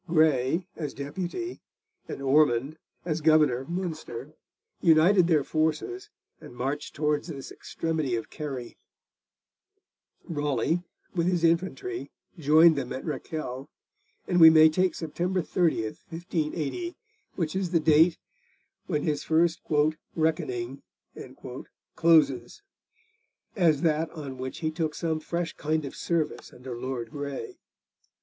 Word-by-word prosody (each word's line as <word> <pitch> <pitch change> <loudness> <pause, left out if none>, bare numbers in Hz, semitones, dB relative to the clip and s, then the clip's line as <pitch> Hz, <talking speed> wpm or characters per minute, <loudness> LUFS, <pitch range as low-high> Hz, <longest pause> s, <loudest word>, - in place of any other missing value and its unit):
Grey, 155 0 +2
as 150 -3 -5
Deputy, 180 - -5 0.5
and 140 - -6
Ormond, 140 +1 +3 0.3
as 160 -2 -1
governor 155 -5 +4
of 135 - -10
Munster, 155 -7 -5 0.5
united 170 +2 +5
their 155 -5 +3
forces 160 - -1 0.3
and 120 - -12
marched 135 +4 -3
towards 150 +1 0
this 140 -5 -7
extremity 155 -6 -2
of 115 - -5
Kerry; 135 -6 -6 1.5
Raleigh, 150 +1 0 0.3
with 170 -2 0
his 175 -2 +1
infantry, 190 - 0 0.3
joined 160 +2 +6
them 135 -3 -3
at 130 - -5
Rakele; 140 -3 -5 0.6
and 175 -1 +2
we 160 - +12
may 160 0 +7
take 185 +4 +1
September 175 +4 -2
30, 170 -9 +1 0.3
1580, 165 - -3 0.4
which 165 -2 -2
is 190 -2 -1
the 170 -1 +3
date 160 +2 +5 0.7
when 150 - -1
his 150 -3 -1
first 165 +1 +2 0.5
'reckoning' 135 -5 -1 1.1
closes, 160 - +3 0.9
as 165 -7 +3
that 160 0 +2
on 140 -5 -8
which 130 +5 -5
he 155 -1 0
took 155 -1 -2
some 160 -2 -1
fresh 170 +1 -3
kind 155 0 -1
of 135 - -7
service 165 -3 -2
under 125 0 -8
Lord 120 -1 -4
Grey. 145 - -6
155 Hz, 120 wpm, -27 LUFS, 140-170 Hz, 1.5 s, we